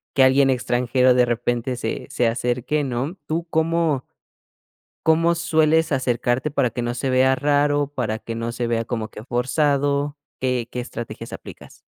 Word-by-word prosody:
que 135 - +6
alguien 135 +1 +5
extranjero 125 0 +2
de 125 0 +4
repente 120 +1 -1
se 115 -2 -4
se 125 - 0
acerque, 125 +5 -1
¿no? 135 +7 -3
¿Tú 165 +2 -2
cómo? 160 -3 +1 1.0
¿cómo 165 +1 +4
sueles 160 -1 +2
acercarte 130 +1 0
para 135 -4 +1
que 120 +2 -4
no 120 0 -2
se 130 +2 -2
vea 130 +1 +4
raro, 145 +1 +2
para 120 -6 -3
que 115 0 -6
no 115 +1 -3
se 120 0 -3
vea 115 -1 0
como 110 -2 -3
que 105 - -10
forzado? 140 +3 0 0.2
¿Qué 125 -2 -1
qué 125 - -4
estrategias 120 -1 -7
aplicas? - - -11
130 Hz, 160 wpm, -22 LUFS, 120-145 Hz, 1.0 s, que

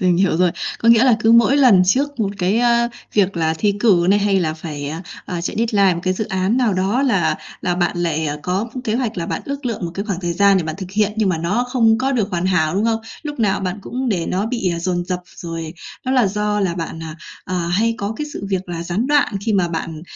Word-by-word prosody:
Mình 180 -2 +3
hiểu 185 -2 +2
rồi. 180 0 +3 0.3
Có 230 - +1
nghĩa 230 +1 +7
là 250 -4 +5
cứ 225 +1 +4
mỗi 235 +4 +5
lần 240 -10 +6
trước 275 +7 +1
một 200 -2 +1
cái, 190 +4 +1
a, 235 0 +3 0.3
việc 195 -3 +2
là 160 -1 +1
thi 200 +5 +1
cử 185 -7 +4
này, 205 - +5
hay 200 -1 +2
là 160 -3 -1
phải, 150 -3 -6
à, 160 +4 -5 0.2
à, 175 -2 -3
chạy 170 - -4
deadline 205 -5 +3
một 170 - -4
cái 185 0 0
dự 215 - -2
án 190 +4 0
nào 240 -6 +2
đó, 195 +8 +1
là 205 -11 +2 0.3
là 180 -1 0
bạn 175 0 0
lại 160 -3 0
có 195 +6 -2
kế 220 -3 0
hoạch 235 -3 -1
là 170 - -3
bạn - - -3
ước 280 -1 -5
lượng 225 -5 -3
một 170 - -3
cái 200 - -3
khoảng 195 -4 -3
thời 175 -2 -1
gian 200 +2 +4
để 185 - +1
bạn 155 0 -4
thực 185 -2 -7
hiện, 210 +1 +1
nhưng 215 -3 +2
mà 170 - 0
nó 200 +9 0
không 225 -3 +3
có 265 +2 0
được 220 -6 0
hoàn 180 -1 -1
hảo, 175 -3 +1
đúng 200 +3 +1
không? 225 -1 +1 0.2
Lúc 295 -3 -6
nào 205 -4 +1
bạn 190 +1 -3
cũng 255 +4 -3
để 180 -7 -1
nó 195 +3 -1
bị 230 -7 -1
dồn 175 0 -1
dập. 180 0 -3 0.2
Rồi 165 -1 -6 0.3
đó 260 - 0
là 250 -5 +4
do 210 +1 -1
là 185 -4 0
bạn, 165 -1 -5
à, 160 -1 -7 0.3
à, 185 - -4
hay 185 +7 +1
có 200 +1 -2
cái 300 - -3
sự 200 - -6
việc 190 -1 -2
là 170 -1 -4
gián 185 +8 -1
đoạn 290 -7 +2
khi 220 - +2
mà 185 -4 +2
bạn, 160 -1 -5
195 Hz, 265 wpm, -19 LUFS, 175-225 Hz, 0.3 s, nghĩa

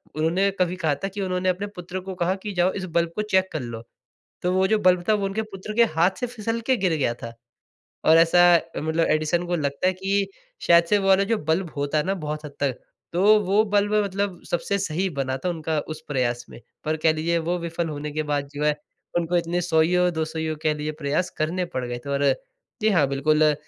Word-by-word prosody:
उन्होंने 170 +6 +2
कभी 180 0 +1
कहा 160 -5 0
था - - +1
कि 200 +1 -5
उन्होंने 185 0 0
अपने 195 +3 -1
पुत्र 180 +1 -5
को 190 0 -7
कहा 180 +1 0
कि 205 -2 -4
"जाओ 180 +1 +2
इस 190 -2 -4
बल्ब 170 0 +1
को 210 - 0
चेक 190 0 +4
कर 155 - -3
लो।" 115 -1 -6 0.6
तो 180 - 0
वो 190 0 +3
जो 220 +1 +3
बल्ब 180 -2 +3
था - - +6
वो 200 -2 0
उनके 195 +3 -1
पुत्र 195 +3 -6
के 235 - +6
हाथ 175 +3 +4
से 245 - -1
फिसल 230 -1 -3
के 260 - +4
गिर 185 -4 +1
गया 120 -4 +1
था। 115 0 -6 0.7
और 160 +1 +7
ऐसा 165 +1 +5 0.4
मतलब 160 +2 0
एडिसन 155 +3 +1
को 175 0 0
लगता 140 +3 -1
है 185 - +4
कि 195 +1 0 0.4
शायद 170 0 +6
से 205 - +5
वो 195 0 -1
वाला 195 +1 +5
जो - - +4
बल्ब 165 +1 +1
होता 145 +2 0
है 150 - 0
ना 195 - +1
बहुत 150 0 -4
हद 145 - -7
तक, 135 -3 +1 0.4
तो 205 +5 +5
वो 205 +4 +3
बल्ब 205 +1 +2
मतलब 195 -2 -2
सबसे 185 +3 0
सही 185 +1 -1
बना 130 0 -1
था - - +1
उनका 160 -2 -2 0.2
उस - - -12
प्रयास 120 -3 -1
में। - - -11 0.3
पर 155 +1 0
कह 160 - +6
लीजिए 170 +2 0
वो 180 - 0
विफल 170 0 -3
होने 150 0 -5
के 155 +1 -1
बाद 140 -1 -1
जो 150 +1 -2
है 150 -1 +3 0.4
उनको 175 +1 0
इतने 170 +1 0
100 160 -2 +3
ईयो 180 +2 +3
200 160 -1 -3
ईयो 160 -1 -2
कह 155 -1 +2
लीजिए 150 +1 -3
प्रयास 150 +6 0
करने 170 +4 0
पड़ 125 - -1
गए 120 0 -4
थे - - -3
और 140 0 0 0.6
जी 220 - +4
हाँ 160 -8 +4
बिल्कुल 150 +2 +3
170 Hz, 235 wpm, -24 LUFS, 155-190 Hz, 0.7 s, और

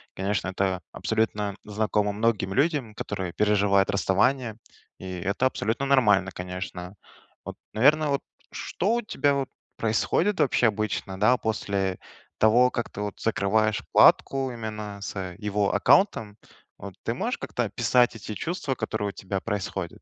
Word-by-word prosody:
Конечно, 95 0 -1
это 95 -1 -1
абсолютно 105 -2 -1
знакомо 105 -1 0
многим 105 -2 0
людям, 140 -6 +1
которые 95 -5 -4
переживают 100 -2 +3
расставание, 110 +4 +1 0.4
и 95 - -9
это 100 +8 +1
абсолютно 115 +2 -2
нормально, 105 -8 +4
конечно. 90 +1 -6 0.5
Вот, - - -8 0.2
наверно, 150 +6 +4
вот 140 - 0 0.3
что 210 +6 -1
у 240 - 0
тебя 145 -9 +1
вот 135 -1 -2 0.3
происходит 160 - +1
вообще 130 -4 +3
обычно, 105 -3 -2
да, 120 +4 +4
после 100 -4 -1 0.4
того, 120 +3 +5
как 120 - -3
ты - - -10
вот 105 -1 -5
закрываешь 110 0 +1
вкладку 135 -1 +4
именно 105 -3 -6
с, 100 - -6
э, 90 -2 -5
его 105 -1 0
аккаунтом, 110 - +3 0.4
вот - - -9
ты - - -1
можешь - - -2
как-то - - -3
описать 120 -2 +2
эти 110 0 -7
чувства, 155 - -3
которые 105 -4 -2
у - - -4
тебя 95 0 -4
происходят? 95 -5 -4
105 Hz, 145 wpm, -26 LUFS, 100-125 Hz, 0.5 s, того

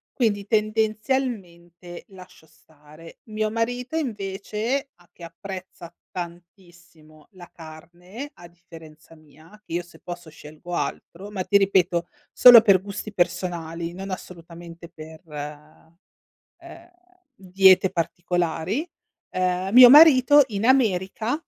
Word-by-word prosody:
Quindi 210 -6 -1
tendenzialmente 215 -6 -3
lascio 185 -4 -16
stare. 155 +1 -18
Mio 215 -1 -3
marito 245 +6 -3
invece 220 +2 -4
a 175 0 -26
che 175 - -17
apprezza 180 0 -11 0.2
tantissimo 175 -3 -12
la 180 -3 -15
carne, 175 - -12
a 175 - -14
differenza 165 -2 -17
mia, 155 +1 -21 0.2
che - - -10
io 175 +1 -2
se 175 - -19
posso 175 -2 -10
scelgo 155 +3 -12
altro, 190 +3 -6
ma 195 -3 -5
ti 200 - +3
ripeto 185 -3 +1 0.2
solo 245 -2 +8
per 195 -4 +3
gusti 205 +1 -8
personali, 170 -2 -3
non 195 +2 -8
assolutamente 170 -1 -11
per, 160 -1 -13 1.4
ehm, 345 0 -15 0.4
diete 190 -3 +3
particolari, 175 - -3 0.5
ehm, 185 +1 -2
mio 245 0 +10
marito 290 -1 +7
in 205 0 -3
America 230 - 0
185 Hz, 110 wpm, -23 LUFS, 170-215 Hz, 1.4 s, mio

